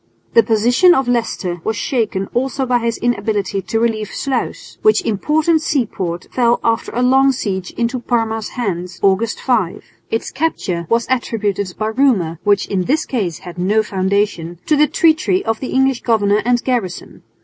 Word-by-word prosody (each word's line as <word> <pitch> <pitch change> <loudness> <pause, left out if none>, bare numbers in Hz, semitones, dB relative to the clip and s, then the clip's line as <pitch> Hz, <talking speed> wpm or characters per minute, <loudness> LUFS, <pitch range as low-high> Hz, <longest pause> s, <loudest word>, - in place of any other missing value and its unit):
The 230 - +7
position 245 - +4
of 265 -2 0
Leicester 210 -7 -1
was 220 - -1
shaken 215 -7 -1
also 265 +2 -1
by 245 -1 +2
his 230 -1 -1
inability 205 -4 -1
to 225 - -2
relieve 220 -2 0
Sluis, 260 +3 -4
which 430 -4 +3
important 305 - +1
seaport 190 - -2
fell 240 -1 +2
after 225 0 0
a 245 - +1
long 265 +2 +4
siege 190 -8 -3
into 240 +2 -1
Parma's 225 -2 -1
hands, 185 -5 -3
August 200 +3 +2
5. 220 -9 0 0.3
Its 225 - -2
capture 190 - -2
was 230 0 +2
attributed 205 -7 -1
by 215 0 -1
rumour, 220 - +1
which 205 -1 +2
in 185 -2 -1
this 305 - +1
case 195 - -2
had 175 0 -8
no 210 +5 +2
foundation, 190 -3 -1
to 305 - +3
the 300 +1 +4
treachery 330 +5 +2
of 225 -1 -1
the 260 - -4
English 265 -1 +1
governor 210 -3 +2
and 245 0 +2
garrison. 235 -9 -3
225 Hz, 165 wpm, -18 LUFS, 195-255 Hz, 0.3 s, The